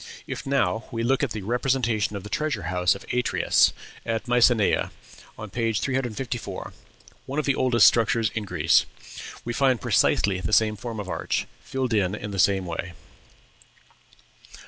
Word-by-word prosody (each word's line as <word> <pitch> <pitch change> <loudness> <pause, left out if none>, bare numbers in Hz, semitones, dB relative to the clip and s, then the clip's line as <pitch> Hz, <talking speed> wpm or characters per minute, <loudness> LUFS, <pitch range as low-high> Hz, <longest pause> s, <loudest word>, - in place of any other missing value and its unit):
If - - -6
now 115 -7 0
we 115 0 -3
look 130 +3 +1
at 140 - 0
the 110 -2 -5
representation 120 -2 0
of 100 - -6
the 105 - -9
"Treasure 150 - -1
house 90 +1 +2
of 100 - -11
Atreus" 125 0 +3 0.3
at 115 +2 -2
Mycenæ, 120 -3 +3 0.5
on 105 -2 -8
page 115 -1 0
354 125 -3 -3 0.5
one 135 - -5
of 155 - 0
the 140 - +2
oldest 125 -4 +4
structures 115 -1 +3
in 110 - -3
Greece 85 -4 +2 0.6
we 120 - -3
find 130 -2 +2
precisely 95 -2 +2
the 105 - -3
same 110 -1 +4
form 115 +1 -6
of 100 - -5
arch, - - -2 0.2
filled 130 -3 -3
in 100 -2 +1
in 105 0 -6
the 100 - -4
same 95 -1 +3
way. 85 +1 -5
115 Hz, 160 wpm, -25 LUFS, 100-125 Hz, 0.6 s, oldest